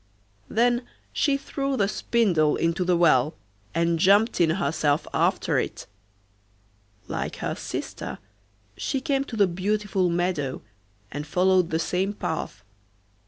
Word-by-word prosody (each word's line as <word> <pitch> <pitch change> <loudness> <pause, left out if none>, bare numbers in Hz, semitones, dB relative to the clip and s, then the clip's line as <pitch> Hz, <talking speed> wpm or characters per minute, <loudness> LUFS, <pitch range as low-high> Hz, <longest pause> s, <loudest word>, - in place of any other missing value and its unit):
Then 240 +2 +2 0.3
she 280 -2 +2
threw 275 -1 -3
the 200 - +2
spindle 185 -9 +2
into 165 +2 0
the 180 -1 +2
well, 155 -4 +4 0.4
and 170 0 +1
jumped 200 +3 +4
in 165 - +4
herself 155 -3 +1
after - - +2
it. - - -4 1.2
Like - - -3
her - - -3
sister - - -5 0.6
she 270 - -2
came 275 -1 0
to 245 - -7
the 205 -2 +5
beautiful 190 +1 0
meadow, 170 -6 -1 0.5
and 145 +2 -5
followed 185 +1 +3
the 160 - 0
same 185 +4 -1
path. 130 - -4
185 Hz, 125 wpm, -25 LUFS, 165-215 Hz, 1.2 s, the